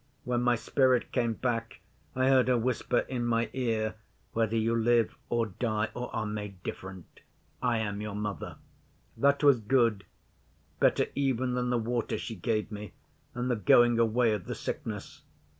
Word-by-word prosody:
When 120 -1 0
my 125 0 +3
spirit 130 +1 +2
came 120 -3 +1
back 115 -1 -3 0.4
I 130 0 +2
heard 130 -2 +5
her 125 -1 +3
whisper 120 +1 0
in 125 -2 -2
my 115 -1 0
ear, 110 -4 -1 0.4
"Whether 115 0 +1
you 115 +1 +1
live 115 0 +2
or 120 -1 +1
die, 110 +1 -2
or 125 0 -5
are - - -1
made 105 -3 -6
different, 95 -2 -8 0.4
I 120 -2 +1
am 105 -2 -2
your 105 -1 -5
Mother." 105 -1 -4 0.6
That 140 +1 +2
was 140 -4 +6
good 115 -3 +2 0.7
better - - +3
even 130 -2 0
than 125 0 -1
the 125 - +2
water 120 +1 -1
she 115 - -5
gave 110 +2 -2
me 105 0 -7 0.4
and 125 +1 -2
the - - +2
going 120 +3 +5
away 115 0 +3
of 105 -4 -4
the - - -4
sickness. - - -5
115 Hz, 165 wpm, -29 LUFS, 110-125 Hz, 0.7 s, was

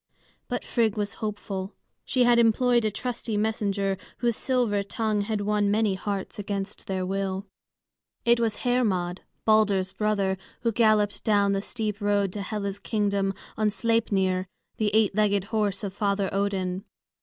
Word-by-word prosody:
But - - -3
Frigg 225 -3 +1
was 205 0 -2
hopeful; 205 -2 -4 0.3
she 255 -1 +2
had 240 -1 +5
employed 235 +1 +4
a - - +3
trusty 230 0 -3
messenger, 200 -2 0 0.2
whose 235 -2 +1
silver 240 -6 +1
tongue 210 +1 -1
had 210 0 -1
won 205 0 +1
many 210 -1 +2
hearts 195 +1 -4
against 200 0 -4
their 185 -1 -1
will. 195 +1 -2 0.8
It 235 0 +5
was 225 -2 -1
Hermod, 195 -8 +1 0.2
Balder's 205 -4 +3
brother, 200 -3 0 0.2
who 230 - +1
galloped 215 -2 +2
down 205 -2 +3
the 195 0 0
steep 215 -1 -3
road 205 -2 +1
to 205 - -4
Hela's 200 0 -3
kingdom, 200 -3 0 0.2
on 215 -1 +2
Sleipnir, 200 -4 +1 0.3
the 215 -1 +2
eight 220 -3 +4
legged 205 -1 +2
horse 210 -2 0
of 195 -2 -3
Father 200 -1 0
Odin. 195 -2 -1
205 Hz, 150 wpm, -26 LUFS, 195-220 Hz, 0.8 s, had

